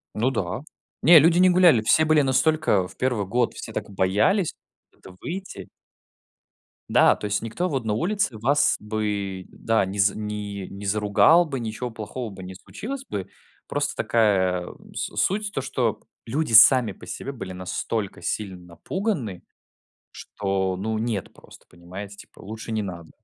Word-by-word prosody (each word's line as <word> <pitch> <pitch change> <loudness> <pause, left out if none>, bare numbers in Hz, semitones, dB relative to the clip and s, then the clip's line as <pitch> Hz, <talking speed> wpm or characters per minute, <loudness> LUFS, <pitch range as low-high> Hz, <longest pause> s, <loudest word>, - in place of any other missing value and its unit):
Ну 115 +5 +1
да. 105 -2 -2 0.4
Не, 165 -2 +9
люди 170 +4 +4
не 185 0 +6
гуляли, 175 -10 +5
все 155 +8 +4
были 155 -1 +4
настолько 135 - +2
в - - -16
1 125 -6 0
год, 120 +4 0
все - - -8
так - - -4
боялись 105 - +1 0.4
куда-то 95 -1 -16
выйти. 175 - -7 1.2
Да, - - +5
то - - -7
есть 105 0 -1
никто 170 +11 -2
вот 130 -5 -2
на 105 - 0
улице 175 - -1
вас 140 +6 +2
бы, 105 -3 -3
да, 110 -3 0
не 100 +2 -6
з 100 +1 +4
не 105 -2 -5
не 100 +1 -9
заругал 105 - +4
бы, 135 -4 -4
ничего 115 +2 -4
плохого 110 +2 -6
бы 95 -1 -10
не 95 0 -8
случилось 270 - -7
бы. 95 -2 -4 0.4
Просто - - -2
такая, 95 -5 +2
м, - - -13
с - - -4
суть 205 +1 0
то, 135 - -2
что 120 -4 -1 0.2
люди 135 +2 -2
сами 115 +2 +7
по - - -13
себе 140 - -5
были 95 -8 -7
настолько 95 +3 -4
сильно 100 -4 -3
напуганы, 110 - -4 0.7
что, 95 -2 -2
ну, 110 +3 -2
нет 110 -5 -3
просто, - - -17
понимаете, 95 +4 -10
типа - - -16
лучше 110 +2 -7
не 110 -1 -1
надо. 85 -4 -7
110 Hz, 165 wpm, -24 LUFS, 100-135 Hz, 1.2 s, Не